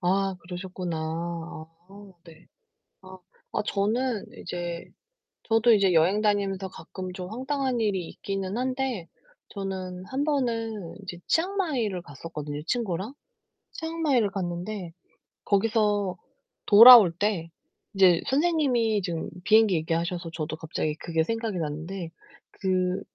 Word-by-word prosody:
아 195 Hz, +1 st, +1 dB
그러셨구나. 180 Hz, -1 st, -5 dB, 0.9 s
아 200 Hz, 0 st, -13 dB
네. 165 Hz, -2 st, -16 dB, 0.6 s
아. 185 Hz, 0 st, -12 dB, 0.4 s
아 -, -, +1 dB
저는 220 Hz, +3 st, 0 dB
이제 175 Hz, -1 st, -5 dB, 0.6 s
저도 225 Hz, +1 st, +4 dB
이제 200 Hz, -4 st, +4 dB
여행 180 Hz, +6 st, +4 dB
다니면서 200 Hz, -2 st, 0 dB
가끔 185 Hz, +2 st, -8 dB
좀 180 Hz, +1 st, -7 dB
황당한 260 Hz, 0 st, -1 dB
일이 190 Hz, -6 st, 0 dB
있기는 195 Hz, +1 st, -4 dB
한데 255 Hz, -7 st, -2 dB, 0.4 s
저는 185 Hz, -2 st, -5 dB
1 275 Hz, +2 st, -2 dB
번은 230 Hz, -, -2 dB
이제 175 Hz, -2 st, -7 dB
치앙마이를 315 Hz, -, 0 dB
갔었거든요 150 Hz, 0 st, -7 dB
친구랑. 220 Hz, 0 st, -2 dB, 0.6 s
치앙마이를 315 Hz, -10 st, 0 dB
갔는데 180 Hz, 0 st, -4 dB, 0.5 s
거기서 205 Hz, -2 st, +1 dB, 0.5 s
돌아올 225 Hz, -3 st, +10 dB
때 195 Hz, -5 st, -1 dB, 0.5 s
이제 185 Hz, -3 st, +5 dB
선생님이 265 Hz, -, +2 dB
지금 170 Hz, -3 st, -3 dB, 0.2 s
비행기 220 Hz, -3 st, +5 dB
얘기하셔서 170 Hz, +2 st, -2 dB
저도 155 Hz, -1 st, -4 dB
갑자기 155 Hz, -1 st, -3 dB
그게 160 Hz, 0 st, -1 dB
생각이 225 Hz, 0 st, -2 dB
났는데 165 Hz, +3 st, -4 dB, 0.4 s
그 185 Hz, -1 st, 0 dB
195 Hz, 260 characters per minute, -26 LUFS, 175-225 Hz, 0.9 s, 돌아올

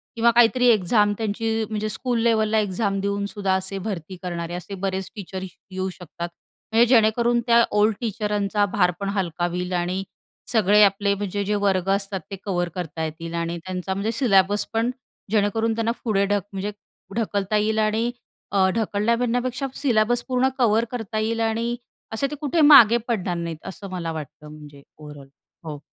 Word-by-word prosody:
किंवा 235 Hz, +1 st, +4 dB
काहीतरी 240 Hz, +1 st, +4 dB
एक्झाम 210 Hz, -1 st, +4 dB
त्यांची 225 Hz, 0 st, -2 dB, 0.2 s
म्हणजे 215 Hz, 0 st, -2 dB
स्कूल 240 Hz, +1 st, -1 dB
लेव्हलला 220 Hz, -1 st, +3 dB
एक्झाम 195 Hz, 0 st, -1 dB
देऊन 200 Hz, 0 st, -1 dB
सुद्धा 200 Hz, -2 st, -1 dB
असे 190 Hz, +1 st, -3 dB
भरती 185 Hz, -2 st, -5 dB
करणारे 170 Hz, -1 st, -4 dB
असे 180 Hz, +3 st, -6 dB
बरेच 190 Hz, -1 st, -2 dB
टीचर 190 Hz, -2 st, -6 dB, 0.3 s
येऊ 190 Hz, 0 st, -2 dB
शकतात. 175 Hz, -1 st, -7 dB, 0.4 s
म्हणजे 230 Hz, +2 st, +5 dB
जेणेकरून 235 Hz, 0 st, +3 dB
त्या 235 Hz, 0 st, +6 dB, 0.2 s
ओल्ड 210 Hz, 0 st, +3 dB
टीचरांचा 210 Hz, -2 st, 0 dB
भारपण 185 Hz, +1 st, +1 dB
हलका 175 Hz, -2 st, -1 dB
होईल 180 Hz, +1 st, -3 dB
आणि 180 Hz, +2 st, -1 dB, 0.5 s
सगळे 210 Hz, -2 st, +4 dB
आपले 200 Hz, 0 st, +3 dB
म्हणजे 205 Hz, 0 st, -3 dB
जे 210 Hz, +1 st, 0 dB
वर्ग 190 Hz, -1 st, +1 dB
असतात 195 Hz, -1 st, -1 dB
ते -, -, -3 dB
कव्हर 175 Hz, -3 st, -1 dB
करता 160 Hz, -2 st, -4 dB
येतील 165 Hz, +2 st, -6 dB
आणि 170 Hz, 0 st, -2 dB
त्यांचा 185 Hz, +2 st, -4 dB
म्हणजे 205 Hz, +4 st, -1 dB
सिल्याबस 205 Hz, -5 st, +3 dB
पण 230 Hz, +2 st, +1 dB, 0.4 s
जेणेकरून 220 Hz, +2 st, +1 dB
त्यांना 230 Hz, 0 st, 0 dB
पुढे 200 Hz, -4 st, +2 dB
ढक 205 Hz, 0 st, +1 dB
म्हणजे 195 Hz, +2 st, -3 dB, 0.4 s
ढकलता 210 Hz, -2 st, 0 dB
येईल 220 Hz, +1 st, +1 dB
आणि 220 Hz, +3 st, +1 dB, 0.4 s
अ, 190 Hz, -2 st, +3 dB
ढकलण्या 220 Hz, +1 st, +1 dB
म्हणण्यापेक्षा 245 Hz, +2 st, -1 dB
सिल्याबस 240 Hz, -2 st, +1 dB
पूर्ण 255 Hz, 0 st, +2 dB
कव्हर 230 Hz, -2 st, +3 dB
करता 220 Hz, -3 st, -3 dB
येईल 225 Hz, +1 st, -1 dB
आणि 230 Hz, +2 st, 0 dB, 0.4 s
असे 275 Hz, +5 st, 0 dB
ते -, -, -3 dB
कुठे 305 Hz, +3 st, +1 dB
मागे 240 Hz, -6 st, +8 dB
पडणार 190 Hz, -6 st, -1 dB
नाहीत 165 Hz, -2 st, -5 dB
असं 195 Hz, +1 st, -8 dB
मला 170 Hz, -3 st, -3 dB
वाटतं 150 Hz, -1 st, -8 dB
म्हणजे 150 Hz, -2 st, -12 dB, 0.2 s
ओव्हरऑल. 145 Hz, -2 st, -11 dB, 0.4 s
हो. 150 Hz, -2 st, -6 dB
205 Hz, 165 wpm, -23 LUFS, 185-225 Hz, 0.5 s, मागे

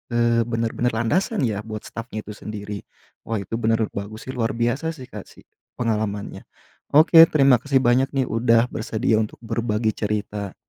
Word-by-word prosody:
eee, 120 Hz, 0 st, +3 dB
benar-benar 115 Hz, 0 st, -1 dB
landasan 190 Hz, -, 0 dB
ya 110 Hz, -5 st, 0 dB
buat 110 Hz, -1 st, -7 dB
stafnya 115 Hz, -2 st, -7 dB
itu -, -, -9 dB
sendiri. 105 Hz, -1 st, -7 dB, 0.5 s
Wah 115 Hz, -1 st, -1 dB
itu 115 Hz, +5 st, -4 dB
benar 115 Hz, 0 st, +1 dB
bagus 100 Hz, +2 st, -7 dB
sih 130 Hz, -, -5 dB
luar 115 Hz, -2 st, -1 dB
biasa 120 Hz, +7 st, 0 dB
sih 130 Hz, -, -10 dB
Kak 105 Hz, -2 st, -8 dB
sih, -, -, -18 dB, 0.3 s
pengalamannya. 110 Hz, -4 st, -3 dB, 0.5 s
Oke 160 Hz, +2 st, +7 dB
terima 135 Hz, -6 st, +4 dB
kasih 140 Hz, -2 st, +1 dB
banyak 130 Hz, +4 st, +2 dB
nih, 135 Hz, -, +2 dB
udah 115 Hz, +1 st, +3 dB
bersedia 110 Hz, 0 st, 0 dB
untuk 110 Hz, -1 st, -3 dB
berbagi 115 Hz, -1 st, -1 dB
cerita. 105 Hz, -2 st, -3 dB
115 Hz, 165 wpm, -23 LUFS, 110-125 Hz, 0.5 s, Oke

